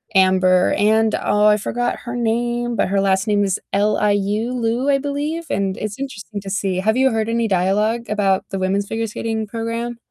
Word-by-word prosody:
Amber 185 -1 +4
and 220 +1 +3
oh, 210 0 +3
I 210 0 +5
forgot 240 +3 -2
her 240 +1 -4
name, 240 +1 -1
but - - +2
her 195 0 +1
last 195 +2 +1
name 205 -1 +2
is 195 -2 0
L-I-U, 205 +2 +1
Liu, 240 +3 0
I 275 - +4
believe, 295 +4 -3
and 195 -1 -1
it's 215 +3 -5
interesting 220 -6 -6
to 195 - -7
see. 195 -2 -1
Have 220 +5 +1
you 265 -1 +3
heard 225 0 -1
any 230 0 0
dialogue 210 +5 +1
about 200 -2 +1
the 195 - -3
women's 195 +2 0
figure 225 0 -2
skating 220 0 -3
program? 230 +2 -4
215 Hz, 190 wpm, -20 LUFS, 200-235 Hz, -, I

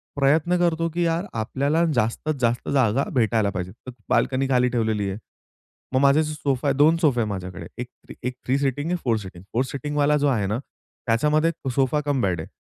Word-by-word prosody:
प्रयत्न 155 +5 +2
करतो, 165 -1 +1
की 170 +2 -3
यार 165 +2 0
आपल्याला 140 +8 0
जास्तीत-जास्त 120 +1 0
जागा 130 -1 +2
भेटायला 110 -4 +2
पाहिजे. 90 -2 -4 0.2
तर - - -5 0.2
बाल्कनी 135 0 +2
खाली 125 -1 +3
ठेवलेली 110 -4 0
आहे. 95 - -4 0.8
मग 130 - +3
माझे 140 +3 +5
सोफा 145 -3 -2
आहे, 140 - +2
2 155 +3 +5
सोफा 135 -8 +3
आहे 110 - 0
माझ्याकडे 95 -1 -6
एक 125 - -5 0.4
एक 125 +1 -2
3 130 +2 +2
सीटिंग 140 +3 -1
आहे 180 - +1
4 115 -3 +2
सिटिंग. 95 -4 -9
4 125 - +2
सिटिंग 145 +1 -4
वाला 150 +1 +3
जो - - +4
आहे 110 -8 +1
ना 105 +3 -1
त्याच्यामध्ये 150 +5 -1 0.2
सोफा 135 +2 +2
कम 140 -3 +1
बेड 90 -5 0
आहे. - - -8
135 Hz, 190 wpm, -23 LUFS, 115-150 Hz, 0.8 s, माझे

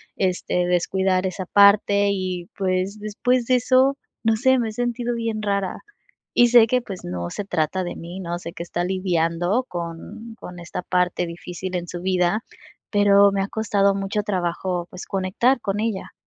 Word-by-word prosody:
este 180 -1 0
descuidar 185 +1 +1
esa 185 0 -5
parte, 200 0 +5
y 185 -2 -3
pues, 190 +1 -1
después 235 +4 0
de 255 - +3
eso, 260 +3 +3 0.3
no 225 -1 +2
sé, 260 +2 +4
me 225 -2 -1
he - - -6
sentido 240 0 -2
bien 225 -2 -2
rara, 200 -2 -2 0.5
y 240 0 +6
sé 235 -2 +7
que, 250 +2 +2
pues, 195 -5 -8
no 85 -1 -4
se 205 - -4
trata 180 +1 -1
de 175 - -5
mí, 175 +3 -8
¿no?, 175 -1 -3
sé 170 -1 -8
que - - -8
está 175 0 -3
lidiando 180 +4 0
con 175 +7 -7
con 180 0 -9
esta 170 +1 -6
parte 180 -1 0
difícil 180 +2 -6
en 175 0 -3
su 175 0 -6
vida, 185 +3 +1 0.5
pero, 200 -1 +5
me 195 0 0
ha 195 - -1
costado 200 -3 +1
mucho 200 +2 -1
trabajo, 180 -2 -2
pues, 185 - -9
conectar 195 +7 +1
con 200 -1 -2
ella. 220 -3 -2
195 Hz, 175 wpm, -23 LUFS, 180-215 Hz, 0.5 s, sé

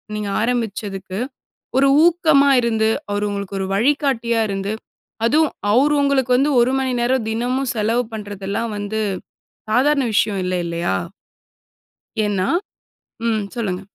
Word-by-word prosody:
நீங்க 210 -1 -3
ஆரம்பிச்சதுக்கு 205 -5 -2 0.6
ஒரு 275 +1 +5 0.2
ஊக்கமா 315 -5 +4
இருந்து 225 -2 +1 0.2
அவரு 205 0 0
உங்களுக்கு 200 -1 -4
ஒரு 190 - -2
வழிகாட்டியா 235 -1 +1
இருந்து, 195 +2 -2 0.5
அதுவும் 305 +5 +3 0.2
அவரு 275 +6 +4
உங்களுக்கு 275 -3 +1
வந்து 285 +3 +2
ஒரு 250 +2 +2
மணி 260 -1 -1
நேரம் 245 -1 +1
தினமும் 250 +3 -1
செலவு 225 +3 +1
பண்ணுறதெல்லாம் 205 +1 -4
வந்து 205 +2 -3 0.7
சாதாரண 275 +5 +3
விஷயம் 210 -1 +2
இல்ல 185 - -1
இல்லயா 170 0 -1 1.3
ஏனா, 195 -2 0 0.8
ம் 220 -2 +1
சொல்லுங்க. 195 -6 -2
225 Hz, 120 wpm, -20 LUFS, 205-265 Hz, 1.3 s, ஒரு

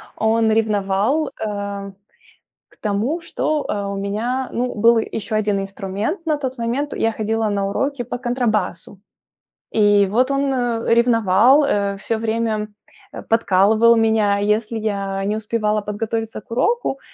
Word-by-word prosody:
он 220 0 +2
ревновал, 215 +6 +1
э, 200 -2 -5 0.8
к - - -26
тому, 215 +11 -1
что, 310 -2 -2
э, 205 -1 -2
у - - -4
меня, 225 +6 -2
ну, 250 +1 -2
был 230 +2 +4
ещё 220 0 -3
1 205 -2 0
инструмент. 200 - -4
На 310 -2 +2
тот 260 -2 -4
момент 245 +5 -2
я 225 - 0
ходила 220 0 -1
на 200 -1 -1
уроки 270 +4 -2
по 245 +1 -5
контрабасу, 215 -7 -2 0.7
и 205 -2 +4
вот 245 +7 +1
он, 275 0 +1
э, 235 -2 0
ревновал, 235 +3 +4
э, 200 -6 0
всё 225 +2 -2
время, 220 -1 -1 0.4
э, - - -8
подкалывал 225 +1 +4
меня, 220 -2 +2
если 215 +2 0
я 195 -2 -2
не 210 +2 -1
успевала 215 -1 -1
подготовиться 220 +2 -4
к - - -31
уроку, 275 - 0
220 Hz, 145 wpm, -20 LUFS, 205-240 Hz, 0.8 s, был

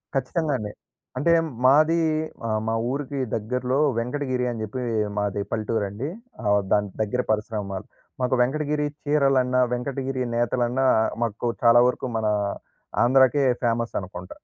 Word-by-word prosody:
ఖచ్చితంగా 150 +3 0
అండి. 105 -2 -5 0.5
అంటే 145 +6 +2 0.3
మాది 155 +5 +5 0.5
ఆహ్, 110 -1 0
మా 115 - 0 0.2
ఊరికి 140 +1 -3 0.2
దగ్గరలో 125 +4 -1 0.2
వెంకటగిరి 125 +1 -1
అని 115 -2 -5
చెప్పి 110 +4 -5 0.4
మాది 105 0 -1
పల్లెటూరండి. 110 +3 -2 0.3
ఆహ్, 105 -1 +3
దాని 105 -1 +2
దగ్గర 110 +4 0
పరిశ్రమాల్. 105 -3 -3 0.4
మాకు 125 +1 +2
వెంకటగిరి 150 +3 0 0.2
చీరలన్నా, 135 -4 +2
వెంకటగిరి 130 +1 -2
నేతలన్నా, 120 +2 +1 0.4
మాకు 115 +1 -2 0.2
చాలా 120 0 +7
వరకు 125 - -2
మన 110 -1 0 0.8
ఆంధ్రాకే 130 +3 +4 0.2
ఫేమస్ 115 0 0
అనుకుంట. 90 -1 -8
125 Hz, 120 wpm, -24 LUFS, 110-135 Hz, 0.8 s, చాలా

